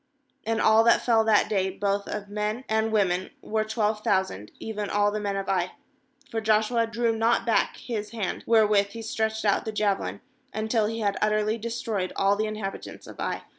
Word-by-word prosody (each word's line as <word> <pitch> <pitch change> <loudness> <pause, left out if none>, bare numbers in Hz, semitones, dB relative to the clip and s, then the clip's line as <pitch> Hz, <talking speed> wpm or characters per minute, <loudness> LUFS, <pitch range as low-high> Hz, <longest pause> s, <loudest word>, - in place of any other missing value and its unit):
^And 225 0 +1
all 220 +1 +5
that 235 - +5
fell 225 -2 +4
that 215 -2 +4
day, 190 -2 +1
both 200 +1 -1
of 210 -1 -5
men 210 +4 -3
and 220 0 +1
women, 190 -4 +1
were 220 0 -1
twelve 215 -1 -1
thousand, 190 - 0
even 210 -2 -4
all 205 0 +2
the 215 - -2
men 200 -1 -2
of 195 0 -3
Ai. 185 -2 0 0.6
26For 225 - -2
Joshua 220 +2 +2
drew 230 0 0
not 230 +1 +2
back 230 - +1
his 220 -5 -4
hand, 215 -5 -4
wherewith 215 -3 +4
he 230 - -7
stretched 220 0 -2
out 200 - +2
the 220 - -4
jave 210 -2 +1
lin, - - -5 0.3
until 215 0 +1
he 225 +1 -3
had 200 -2 0
utterly 215 +1 +1
destroyed 225 -4 -3
all 195 +1 +3
the 215 +1 -1
inhabitants 215 -2 -6
of - - -12
Ai. - - -3
215 Hz, 195 wpm, -26 LUFS, 205-225 Hz, 0.6 s, all